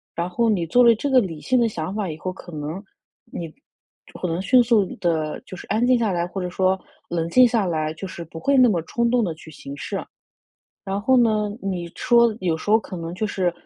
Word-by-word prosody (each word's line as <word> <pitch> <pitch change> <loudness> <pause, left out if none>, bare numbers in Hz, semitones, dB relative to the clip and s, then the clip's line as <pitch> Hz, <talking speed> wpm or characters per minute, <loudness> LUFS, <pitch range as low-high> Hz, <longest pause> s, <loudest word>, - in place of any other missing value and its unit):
然 170 +1 -1
后 230 +6 +1
你 185 -6 +1
做 245 +10 +4
了 235 -1 +6
这 280 +6 -3
个 265 -1 +6
理 175 -9 -3
性 255 0 +2
的 235 - +3
想 185 -3 -4
法 205 -3 -2
以 155 - -6
后， 185 +3 -4
可 180 - -12
能 155 +5 -5 0.4
你 165 -2 -7 0.7
可 180 - -2
能 170 +1 -2
迅 255 +6 +5
速 230 -3 +3 0.2
地 160 -4 -1
就 - - -9
是 - - -10
安 225 +3 +1
静 250 0 +4
下 225 -4 0
来， 175 -1 0
或 190 +1 -5
者 180 - -3
说 190 +1 +1 0.3
冷 165 -1 -1
静 250 +7 +6
下 225 -4 +1
来， 155 -3 -1
就 190 +5 -7
是 175 -2 -7
不 165 0 -9
会 275 +9 +2
那 255 -1 +7
么 175 -6 +1
冲 235 +8 0
动 245 -1 +3
地 175 -5 -1
去 160 0 -13
行 140 -1 -9
事。 - - -4 0.8
然 195 +1 -2
后 260 +4 +4
呢， 215 -3 +2
你 185 -3 -3
说 235 -2 +4
有 175 -3 0
时 160 - -7
候 220 +1 +6
可 200 - -9
能 165 -1 -5
就 215 - -1
是， 190 -3 0
190 Hz, 260 characters per minute, -23 LUFS, 170-230 Hz, 0.8 s, 那